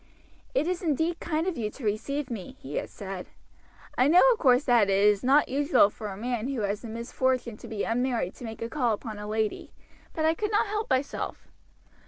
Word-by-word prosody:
"It 405 - +2
is 360 0 -1
indeed 325 +1 0
kind 320 0 -1
of 370 -8 -2
you 215 -2 -1
to 260 - -12
receive 255 +7 -2
me," 205 -6 -6
he 140 +2 -6
had - - -3
said. 195 -2 -7 0.7
"I 255 - +4
know, 345 +5 +7
of 455 - -7
course, 255 -1 +4
that 235 -7 +4
it 195 - +3
is 205 0 +4
not 275 +4 +4
usual 280 -6 +3
for 215 - -7
a 195 -2 -6
man 240 +1 -2
who 270 -4 -2
has 205 +1 -1
the 235 - -8
misfortune 235 +1 -1
to - - -11
be 215 -2 -3
unmarried 235 -5 0
to - - -10
make 225 -1 -6
a - - -2
call 245 -7 +1
upon 215 -1 -8
a 210 - -6
lady, 215 0 -2 0.4
but 315 - -1
I 320 - +4
could 420 +5 -2
not 420 0 +2
help 425 +1 -3
myself. 260 +2 -2
245 Hz, 220 wpm, -27 LUFS, 215-295 Hz, 0.7 s, know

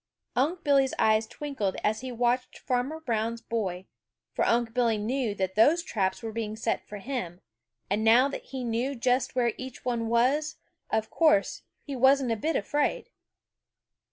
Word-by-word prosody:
Unc' 310 +8 0
Billy's 275 -2 +3
eyes 220 0 +3
twinkled 270 -10 -3
as 215 +2 0
he 260 -1 -5
watched 245 +1 0
Farmer 255 +5 -2
Brown's 230 -5 -2
boy, 195 -6 -3 0.5
for - - 0
Unc' 235 -1 +1
Billy 235 -3 +2
knew 225 0 -1
that 190 -1 -2
those 295 - +4
traps 195 - -1
were 225 - -4
being 215 -1 -4
set 225 +1 -2
for 210 - -7
him, 195 -6 -5 0.5
and 205 +3 0
now 235 +4 +6
that 280 - -6
he 260 -2 -6
knew 240 +4 -1
just 250 +1 0
where 240 -3 +2
each 260 -1 -8
one 235 -2 -1
was, 265 +7 +2 0.3
of 220 0 -1
course 200 - +3 0.2
he 280 - -6
wasn't 265 0 +4
a - - +2
bit 310 +9 -1
afraid. 295 - -1
240 Hz, 165 wpm, -28 LUFS, 220-265 Hz, 0.5 s, now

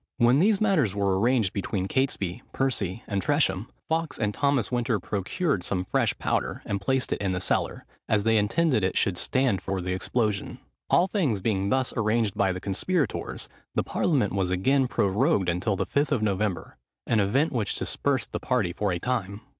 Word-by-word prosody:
When 125 +2 +4
these 200 +3 +3
matters 160 - +2
were 100 -2 +1
arranged 115 -3 +2
between 95 -1 -2
Catesby, 120 -5 -1
Percy, 115 -7 -1
and 100 -2 -2
Tresham, 120 -8 +1 0.2
Fawkes 160 -1 -1
and 105 -2 -1
Thomas 140 -5 +1
Winter 120 -3 0
procured 100 - -1
some 90 -1 -2
fresh - - 0
powder, - - -2
and 100 0 -2
placed 130 +5 0
it - - -4
in 95 -2 0
the 90 - -1
cellar, - - -1 0.2
as 105 -2 +2
they 115 0 +3
intended 125 - +2
it 95 - 0
should 95 - +2
stand 125 0 +1
for 95 0 -3
the 90 0 -2
explosion. 105 +2 -1 0.3
All 180 - +5
things 165 - 0
being 100 -1 0
thus 130 +2 +1
arranged 110 -2 +1
by 100 -2 +1
the 90 - -4
conspirators, 120 - -2 0.3
the - - +2
parliament 130 - 0
was 95 -2 0
again 130 +9 +2
prorogued 105 - +1
until 90 +5 0
the 95 0 -1
Fifth 145 +2 0
of 125 -7 +1
November; 100 -2 -1 0.3
an 115 - +2
event 125 +10 +2
which 110 -6 -1
dispersed - - -1
the - - -3
party 85 - 0
for 100 +1 -1
a 90 - 0
time. 100 -1 -3
105 Hz, 185 wpm, -26 LUFS, 95-130 Hz, 0.3 s, All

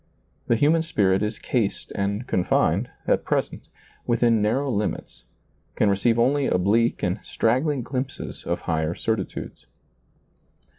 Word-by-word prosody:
The 115 - +3
human 150 +7 +3
spirit 100 - +1
is 105 +1 -2
cased 115 -6 -2
and 100 +3 -2
confined, 90 - +1 0.2
at - - +2
present, - - -2 0.4
within 115 -2 +3
narrow 130 +6 +1
limits, 105 -2 -3 0.5
can 105 - +3
receive 105 +4 +2
only 135 +4 +2
oblique 110 +6 +2
and 90 +2 0
straggling 130 +4 0
glimpses 130 +1 -5
of 85 - -2
higher 80 0 -1
certitudes. 110 -5 -4
110 Hz, 120 wpm, -24 LUFS, 100-125 Hz, 0.5 s, The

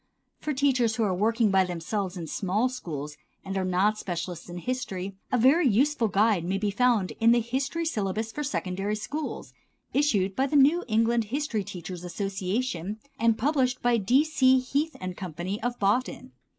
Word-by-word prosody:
For 305 - -3
teachers 255 -5 +2
who 230 - 0
are 200 -3 +1
working 220 +3 +2
by 190 -1 +5
themselves 180 +2 -3
in 170 - -5
small 200 +9 0
schools 150 - -6 0.3
and 195 0 -4
are 190 - 0
not 190 +4 +1
specialists 175 -1 -5
in 175 - -6
history 195 -4 -4 0.2
a 250 - +3
very 275 +7 +5
useful 250 +2 +2
guide 205 -3 +2
may 185 +3 -1
be 205 0 -1
found 230 -3 +2
in 230 +1 +5
the 240 - +4
"History 270 +8 -2
Syllabus 215 - -2
for 295 - -4
Secondary 200 -7 -2
Schools," 290 +9 -5 0.4
issued 205 -10 +2
by 265 +1 +1
the 295 - -2
New 290 +5 +5
England 230 +1 +2
History 235 -2 -2
Teachers' 180 -1 -7
Association, 195 +1 -3 0.2
and 230 0 +3
published 260 -2 +1
by 240 -1 +3
D. 245 +7 +3
C. 260 -4 +4
Heath 280 +4 -1 0.2
& - - -11
Co., 180 -4 -6 0.3
of 245 +1 -2
Boston. 245 +5 0
220 Hz, 175 wpm, -27 LUFS, 190-255 Hz, 0.4 s, by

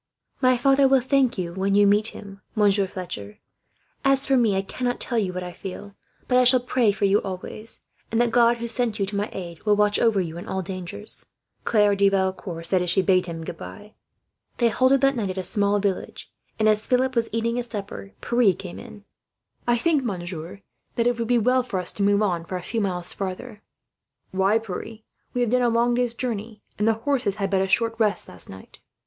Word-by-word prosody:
"My 255 -1 +4
father 270 +2 +4
will 270 0 +5
thank 260 -1 +1
you, 175 -2 -3
when 195 +2 0
you 205 0 +6
meet 205 +2 +3
him, 200 -2 -9
Monsieur 200 -2 +3
Fletcher. 105 - -6 0.7
As 275 0 +3
for 270 - +2
me, 230 -6 +3
I 190 - 0
cannot 245 +5 -3
tell 240 -3 +1
you 195 -4 -1
what 180 0 -5
I 180 - -6
feel, 195 +2 -8 0.3
but 250 0 +4
I - - +5
shall 250 +1 +7
pray 245 -3 +2
for 200 0 -1
you 200 +1 +4
always; 195 +3 -6 0.3
and 225 - +1
that 240 -1 +2
God, 235 0 +4
who 235 0 -4
sent 235 -2 -1
you 195 - 0
to 200 +1 -5
my 205 +1 -1
aid, 170 -3 -7
will 210 -1 +3
watch 210 0 +3
over 225 -4 +3
you 170 -2 -3
in - - -9
all 190 0 -2
dangers," 185 +3 -5 0.4
Claire 210 -3 +3
de 200 0 +4
Valecourt 190 -2 -1
had 165 - -7
said, 185 0 +2
as 180 - -1
she 190 +2 +3
bade 185 -1 +2
him 165 -1 -6
goodbye. 205 +6 -9 0.6
They 235 -1 +3
halted 260 +4 +3
that 275 0 +3
night 215 -5 -2
at 185 - -5
a 190 - -2
small 205 0 +2
village 200 -2 -3 0.3
and, 215 - +2
as 215 0 +2
Philip 260 +1 +1
was 230 -1 +1
eating 230 +1 -1
his 245 0 -2
supper, 200 -2 -7
Pierre 235 -6 +3
came 180 -1 -8
in. 215 -4 -12 0.6
"I 240 0 +3
think, 300 +2 +1
monsieur, 180 -4 -4 0.4
that 235 - +1
it 245 -1 +1
would 230 - -1
be 245 0 +3
well 250 +3 +3
for 240 -6 -4
us 180 - -3
to - - -7
move 200 +1 +3
on 175 -5 0
for 185 - -4
a 180 - -8
few 225 +5 -2
miles 180 -3 -1
farther." 205 +3 -6 0.7
"Why, 195 +3 +2
Pierre? 225 +1 -7 0.3
We 245 - +1
have 240 -2 +1
done 250 0 +3
a 240 - +3
long 235 +1 +2
day's 240 -1 0
journey, 225 -3 -5 0.2
and 210 - +2
the 225 - +5
horses 240 -3 -1
had 195 -2 -2
but 190 -1 +2
a 190 - 0
short 230 +3 +2
rest 210 -2 +1
last 90 - -5
night." 95 0 -13
210 Hz, 225 wpm, -24 LUFS, 190-240 Hz, 0.7 s, shall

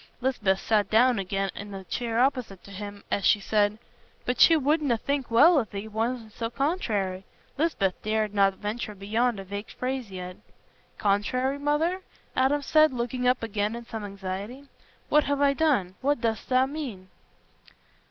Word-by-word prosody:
Lisbeth 220 -7 +1
sat 215 -2 +1
down 240 +1 +4
again 195 +1 -2
in 205 0 -8
the 195 -1 -7
chair 230 +4 -2
opposite 250 -7 0
to 200 - -13
him, 205 +1 -8
as 200 - 0
she 205 - +4
said: 205 +1 +1 0.5
"But 250 - -1
she 330 - +8
wouldna 290 -3 +1
think 280 +3 -2
well 300 +8 +6
if 225 - -3
thee 200 +2 -6
wastna 225 +1 -3
so 230 +1 -4
contrairy." 220 - -1 0.3
Lisbeth 265 - 0
dared 215 -1 -1
not 195 -1 +3
venture 210 +1 -4
beyond 220 +3 0
a - - -6
vague 200 +2 -6
phrase 255 -3 -3
yet. 180 -1 -7 0.6
"Contrairy, 255 +7 0
mother?" 310 +6 0 0.3
Adam 280 +3 +2
said, 310 +1 +5
looking 250 0 -2
up 250 -1 +2
again 210 0 -1
in 235 0 -8
some 225 -2 -6
anxiety. 200 +7 -6 0.4
"What 300 -1 +4
have 285 0 0
I 280 -1 +4
done? 275 - +1
What 285 0 +1
dost 225 -1 -2
mean?" 255 -7 -1
230 Hz, 160 wpm, -27 LUFS, 200-270 Hz, 0.6 s, she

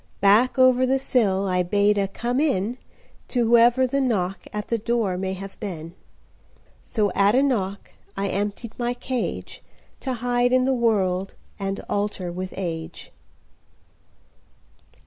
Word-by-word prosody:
Back 210 +7 +4
over 255 0 +5
the 265 +1 +3
sillI 195 -8 +1
bade 205 +3 +2
a 195 - +1
"Come 240 +6 -2
in"To 245 -1 -2
whoever 240 +2 +5
the 275 +2 0
knockAt 210 -3 -2
the 230 - -1
door 225 -4 0
may 190 +1 -2
have 195 +1 -9
been. 170 -5 -6 0.9
So 210 -5 0
at 200 +3 +3
a 265 - +4
knockI 200 -8 0 0.4
emptied 205 +3 -2
my 240 0 -1
cageTo 255 +1 -5
hide 245 +1 +1
in 255 0 +4
the 265 - +2
worldAnd 195 -3 -1
alter 200 -3 -2
with 185 +1 -5
age. 165 -3 -5
210 Hz, 120 wpm, -24 LUFS, 195-245 Hz, 0.9 s, over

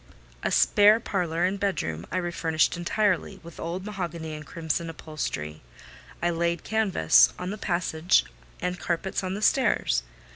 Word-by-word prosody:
A - - 0
spare 210 +2 +5
parlour 175 -6 -1
and 190 +2 0
bedroom 85 - -2
I - - -1
refurnished 170 -3 +1
entirely, 190 +2 0
with 170 -1 -12
old 175 +3 -4
mahogany 170 -6 -5
and 150 0 -7
crimson 165 +1 -3
upholstery: 145 - -5 0.6
I 175 - +2
laid 170 0 -1
canvas 210 - +4
on 180 +1 -4
the 210 - -5
passage, 175 -3 +1 0.3
and 180 0 -3
carpets 185 +3 -2
on 185 0 -2
the 210 - -5
stairs. 210 - +2
175 Hz, 145 wpm, -26 LUFS, 160-195 Hz, 0.6 s, spare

